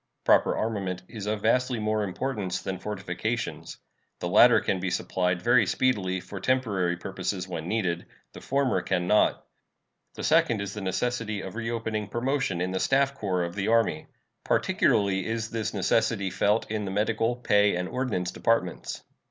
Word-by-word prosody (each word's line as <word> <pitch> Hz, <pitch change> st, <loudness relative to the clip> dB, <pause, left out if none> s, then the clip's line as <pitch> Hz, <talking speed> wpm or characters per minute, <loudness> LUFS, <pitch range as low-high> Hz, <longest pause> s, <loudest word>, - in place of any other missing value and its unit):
Proper -, -, +4 dB
armament 95 Hz, -5 st, -2 dB
is 105 Hz, -3 st, -7 dB
of 105 Hz, -1 st, -2 dB
vastly 125 Hz, +2 st, +2 dB
more 110 Hz, 0 st, 0 dB
importance 100 Hz, -1 st, -3 dB
than 95 Hz, -2 st, -4 dB
fortifications. 105 Hz, +3 st, -4 dB, 0.4 s
The 90 Hz, -, -3 dB
latter 120 Hz, +6 st, +7 dB
can 95 Hz, -, -1 dB
be 95 Hz, +1 st, -2 dB
supplied 90 Hz, 0 st, -1 dB
very 120 Hz, -3 st, +4 dB
speedily 95 Hz, -8 st, +1 dB
for 100 Hz, +2 st, -8 dB
temporary 100 Hz, -7 st, 0 dB
purposes 95 Hz, 0 st, -4 dB
when 85 Hz, -3 st, -5 dB
needed; 90 Hz, -5 st, -1 dB, 0.3 s
the -, -, -10 dB
former 135 Hz, -8 st, +1 dB
can 90 Hz, -1 st, -1 dB
not. 105 Hz, +4 st, +2 dB, 0.7 s
The -, -, -6 dB
second 115 Hz, -, +3 dB
is 100 Hz, 0 st, -4 dB
the 105 Hz, -, -6 dB
necessity 110 Hz, +2 st, -2 dB
of 95 Hz, -, -7 dB
reopening 110 Hz, -2 st, -3 dB
promotion 120 Hz, -6 st, -1 dB
in 90 Hz, +1 st, -1 dB
the 95 Hz, -, -1 dB
staff 135 Hz, +4 st, +2 dB
corps 95 Hz, -9 st, -1 dB
of 85 Hz, 0 st, -4 dB
the 95 Hz, +1 st, -2 dB
Army. 115 Hz, -9 st, +2 dB, 0.4 s
Particularly 95 Hz, -2 st, +2 dB
is 115 Hz, 0 st, -3 dB
this 115 Hz, -3 st, -2 dB
necessity 95 Hz, -2 st, +1 dB
felt 105 Hz, +5 st, +2 dB
in 105 Hz, -1 st, -2 dB
the -, -, -3 dB
Medical, 110 Hz, +4 st, 0 dB
Pay, 105 Hz, -5 st, +3 dB
and 90 Hz, +1 st, -2 dB
Ordnance 105 Hz, -7 st, -2 dB
departments. 115 Hz, -6 st, -1 dB
105 Hz, 160 wpm, -27 LUFS, 95-115 Hz, 0.7 s, latter